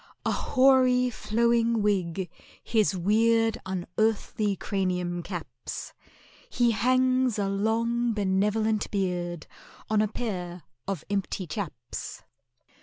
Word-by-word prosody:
A -, -, +2 dB
hoary 255 Hz, -2 st, +4 dB
flowing 230 Hz, 0 st, +1 dB
wig 190 Hz, -3 st, 0 dB, 0.4 s
his 215 Hz, -4 st, +1 dB
weird 225 Hz, +4 st, +3 dB
Unearthly 205 Hz, +2 st, 0 dB
cranium 180 Hz, -2 st, -2 dB
caps, -, -, -7 dB, 0.6 s
He 240 Hz, -, +2 dB
hangs 255 Hz, +2 st, +2 dB
a 200 Hz, -1 st, 0 dB
long 230 Hz, +4 st, +1 dB
benevolent 210 Hz, +2 st, +1 dB
beard 175 Hz, -4 st, -2 dB, 0.5 s
On 215 Hz, -1 st, +4 dB
a 215 Hz, -, +2 dB
pair 180 Hz, -6 st, -5 dB, 0.2 s
of 195 Hz, -2 st, -3 dB
empty 195 Hz, -1 st, -2 dB
chaps. 155 Hz, -, -6 dB
210 Hz, 100 wpm, -27 LUFS, 190-230 Hz, 0.6 s, hoary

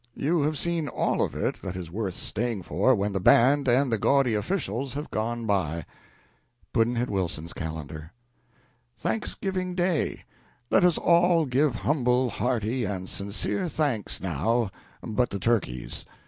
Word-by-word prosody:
You 160 Hz, +3 st, +1 dB
have 150 Hz, +1 st, 0 dB
seen 170 Hz, -2 st, 0 dB
all -, -, 0 dB
of -, -, -1 dB
it -, -, -2 dB
that 90 Hz, -1 st, -5 dB
is 90 Hz, -3 st, -6 dB
worth 95 Hz, -2 st, -3 dB
staying 115 Hz, -4 st, -2 dB
for -, -, +3 dB
when 100 Hz, +1 st, -1 dB
the 95 Hz, -, 0 dB
band 135 Hz, +8 st, +5 dB
and 130 Hz, +1 st, +3 dB
the 115 Hz, -, +1 dB
gaudy 135 Hz, 0 st, +3 dB
officials 130 Hz, -, -2 dB
have 145 Hz, +1 st, -5 dB
gone 115 Hz, +2 st, -2 dB
by. 85 Hz, -6 st, 0 dB, 0.9 s
Pudd'nhead 120 Hz, +2 st, +2 dB
Wilson's 85 Hz, -4 st, -2 dB
Calendar. 80 Hz, 0 st, -6 dB, 0.9 s
Thanksgiving 185 Hz, -, -2 dB
Day. 175 Hz, -3 st, 0 dB, 0.5 s
Let 180 Hz, -3 st, +4 dB
all 170 Hz, -1 st, +4 dB
give 135 Hz, 0 st, +2 dB
humble, 125 Hz, -3 st, +1 dB
hearty, 120 Hz, 0 st, -1 dB
and 95 Hz, -3 st, -3 dB
sincere 100 Hz, -, -2 dB
thanks, 140 Hz, -11 st, -1 dB
now, 95 Hz, -, 0 dB, 0.3 s
but 120 Hz, +2 st, 0 dB
the 100 Hz, -, -3 dB
turkeys. 95 Hz, -, -1 dB
120 Hz, 140 wpm, -27 LUFS, 100-145 Hz, 0.9 s, band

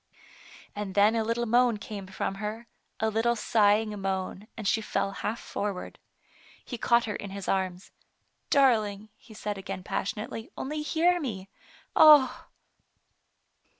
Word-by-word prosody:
And 205 Hz, -2 st, -5 dB
then 205 Hz, +2 st, +5 dB
a 225 Hz, -1 st, +1 dB
little 230 Hz, +2 st, -1 dB
moan 240 Hz, 0 st, +3 dB
came 205 Hz, -2 st, -7 dB
from 190 Hz, 0 st, -3 dB
her, 215 Hz, +3 st, -4 dB, 0.3 s
a 220 Hz, 0 st, +1 dB
little 230 Hz, +2 st, +1 dB
sighing 210 Hz, -2 st, +2 dB
moan, 190 Hz, +1 st, -3 dB
and 215 Hz, -3 st, -4 dB
she 220 Hz, -, +2 dB
fell 195 Hz, -2 st, -1 dB
half 215 Hz, +3 st, -4 dB
forward. 200 Hz, -3 st, -5 dB, 0.7 s
He 245 Hz, -, -6 dB
caught 235 Hz, +1 st, +3 dB
her 210 Hz, -, -3 dB
in 200 Hz, -, -6 dB
his 195 Hz, -1 st, -7 dB
arms. 185 Hz, -1 st, -2 dB, 0.3 s
" -, -, -47 dB
Darling, 215 Hz, -6 st, +2 dB
he 220 Hz, 0 st, -16 dB
said 205 Hz, -1 st, -4 dB
again 195 Hz, -1 st, -6 dB
passionately, 220 Hz, +6 st, -4 dB
" -, -, -43 dB
only 300 Hz, +3 st, -3 dB
hear 340 Hz, +4 st, +2 dB
me. 200 Hz, -, -5 dB, 0.5 s
Ah 300 Hz, -4 st, +7 dB
215 Hz, 150 wpm, -28 LUFS, 195-235 Hz, 0.7 s, Ah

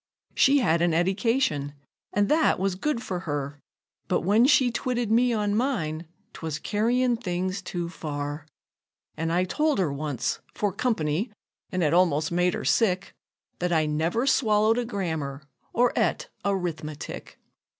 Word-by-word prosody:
She 275 Hz, +2 st, +5 dB
had 170 Hz, -, +2 dB
an 170 Hz, -2 st, +2 dB
edication, 180 Hz, -, +1 dB, 0.4 s
an' 205 Hz, 0 st, +2 dB
that 310 Hz, +7 st, +3 dB
was 195 Hz, 0 st, 0 dB
good 240 Hz, +5 st, -2 dB
for 180 Hz, -2 st, -3 dB
her; 145 Hz, -4 st, -4 dB, 0.5 s
But -, -, +1 dB
when 215 Hz, +7 st, +4 dB
she 265 Hz, -4 st, +4 dB
twitted 240 Hz, -2 st, -1 dB
me 245 Hz, +2 st, +4 dB
on 210 Hz, -2 st, 0 dB
mine, 175 Hz, -, -1 dB, 0.3 s
'twas 160 Hz, -2 st, -4 dB
carryin' 235 Hz, +7 st, +1 dB
things 185 Hz, -2 st, -2 dB
too 175 Hz, -2 st, -4 dB
far; 145 Hz, -2 st, -5 dB, 0.7 s
An' 165 Hz, +1 st, -2 dB
I 175 Hz, +2 st, +2 dB
told 300 Hz, +11 st, +1 dB
her 170 Hz, -7 st, +1 dB
once, 140 Hz, -3 st, -2 dB, 0.2 s
'fore 205 Hz, -3 st, 0 dB
company 205 Hz, -, -1 dB, 0.4 s
(an' 185 Hz, -1 st, 0 dB
it 150 Hz, 0 st, +2 dB
almost 165 Hz, -3 st, +3 dB
made 180 Hz, +1 st, +2 dB
her -, -, -5 dB
sick), 195 Hz, -4 st, +1 dB, 0.5 s
That 180 Hz, 0 st, -1 dB
I 160 Hz, -2 st, +3 dB
never 160 Hz, -, 0 dB
swallowed 220 Hz, -4 st, +3 dB
a 245 Hz, -, -1 dB
grammar, 160 Hz, -, -3 dB, 0.3 s
or 245 Hz, +1 st, +2 dB
'et -, -, 0 dB, 0.2 s
a 200 Hz, 0 st, +1 dB
'rithmetic. 160 Hz, -5 st, -5 dB
185 Hz, 150 wpm, -26 LUFS, 155-230 Hz, 0.7 s, She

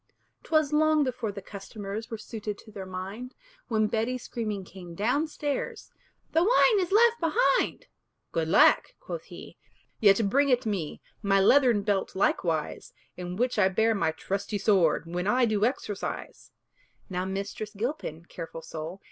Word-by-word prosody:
'Twas 310 Hz, -3 st, +1 dB
long 310 Hz, 0 st, +4 dB
before 250 Hz, -5 st, -2 dB
the 200 Hz, -1 st, -8 dB
customers 205 Hz, +2 st, -7 dB
Were 225 Hz, -, -4 dB
suited 210 Hz, -1 st, -6 dB
to 215 Hz, -, -15 dB
their 195 Hz, -3 st, -7 dB
mind, 195 Hz, +7 st, -6 dB, 0.3 s
When 220 Hz, -3 st, +2 dB
Betty 225 Hz, +4 st, -1 dB
screaming 215 Hz, -5 st, -4 dB
came 175 Hz, -2 st, -11 dB
down 250 Hz, -, +1 dB
stairs, 290 Hz, -2 st, -4 dB, 0.4 s
"The 325 Hz, -, +3 dB
wine 445 Hz, 0 st, +5 dB
is 360 Hz, -1 st, -1 dB
left 465 Hz, +3 st, +5 dB
behind!" 485 Hz, +8 st, +1 dB, 0.5 s
"Good 165 Hz, -1 st, -1 dB
lack!" 180 Hz, -, +5 dB
quoth -, -, -7 dB
he -, -, -12 dB, 0.4 s
"yet 200 Hz, 0 st, +5 dB
bring 280 Hz, +7 st, +3 dB
it 250 Hz, -1 st, +2 dB
me 190 Hz, -8 st, -3 dB, 0.2 s
My 195 Hz, -2 st, +3 dB
leathern 240 Hz, 0 st, +5 dB
belt 200 Hz, -2 st, -1 dB
likewise, 165 Hz, -5 st, -1 dB, 0.2 s
In 180 Hz, 0 st, -5 dB
which 245 Hz, +1 st, 0 dB
I 190 Hz, -2 st, +5 dB
bear 220 Hz, +4 st, +2 dB
my 200 Hz, -6 st, +1 dB
trusty 195 Hz, +6 st, -3 dB
sword 190 Hz, -6 st, +3 dB
When 175 Hz, +3 st, -3 dB
I 245 Hz, +3 st, +4 dB
do 215 Hz, -2 st, +2 dB
exercise." 215 Hz, -5 st, -4 dB, 0.6 s
Now 180 Hz, -2 st, -2 dB
Mistress 200 Hz, +2 st, -5 dB
Gilpin 205 Hz, -, -4 dB
(careful 165 Hz, -2 st, -8 dB
soul!) 160 Hz, +4 st, -7 dB
210 Hz, 155 wpm, -28 LUFS, 190-255 Hz, 0.6 s, wine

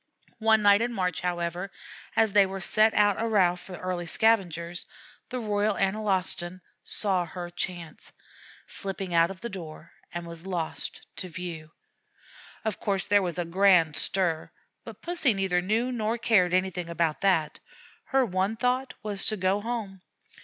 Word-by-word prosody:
One 220 Hz, -1 st, +4 dB
night 205 Hz, +1 st, +6 dB
in 240 Hz, +1 st, 0 dB
March, 180 Hz, -5 st, -1 dB
however, 175 Hz, +1 st, -2 dB, 0.5 s
as 220 Hz, -3 st, +3 dB
they 200 Hz, -1 st, +6 dB
were 195 Hz, +1 st, -5 dB
set 215 Hz, +4 st, +3 dB
out 205 Hz, 0 st, +3 dB
a 230 Hz, -, 0 dB
row 190 Hz, -5 st, +3 dB
for 180 Hz, +1 st, -11 dB
the -, -, -6 dB
early 180 Hz, -2 st, -3 dB
scavenger, 175 Hz, -5 st, +2 dB, 0.6 s
the 255 Hz, -, -3 dB
Royal 210 Hz, -2 st, 0 dB
Analostan 190 Hz, -3 st, -1 dB, 0.2 s
saw 190 Hz, -4 st, +1 dB
her 175 Hz, +1 st, -7 dB
chance, 175 Hz, -2 st, -5 dB, 0.6 s
slipped 195 Hz, 0 st, -3 dB
out 165 Hz, 0 st, +4 dB
of 190 Hz, -1 st, -9 dB
the 235 Hz, -, -3 dB
door, 165 Hz, -5 st, -9 dB, 0.2 s
and 175 Hz, 0 st, -5 dB
was 170 Hz, +2 st, -9 dB
lost 170 Hz, -4 st, -3 dB
to 185 Hz, -, -4 dB
view. 170 Hz, -3 st, -6 dB, 1.0 s
Of 220 Hz, -3 st, -2 dB
course 195 Hz, -3 st, 0 dB
there 205 Hz, 0 st, +4 dB
was 175 Hz, -3 st, -2 dB
a 175 Hz, -, -1 dB
grand 175 Hz, -3 st, +4 dB
stir; 175 Hz, -5 st, 0 dB, 0.3 s
but -, -, -11 dB
Pussy 330 Hz, -, +2 dB
neither 190 Hz, -2 st, +1 dB
knew 220 Hz, +7 st, 0 dB
nor 225 Hz, -1 st, -1 dB
cared 205 Hz, -6 st, +3 dB
anything 185 Hz, -2 st, -1 dB
about 165 Hz, -2 st, 0 dB
that 165 Hz, -6 st, +2 dB, 0.5 s
her 270 Hz, -1 st, +2 dB
one 190 Hz, +1 st, 0 dB
thought 250 Hz, +3 st, 0 dB
was 205 Hz, -2 st, -2 dB
to 215 Hz, -, +3 dB
go 190 Hz, +2 st, +1 dB
home. 215 Hz, -5 st, -4 dB
190 Hz, 160 wpm, -27 LUFS, 175-215 Hz, 1.0 s, night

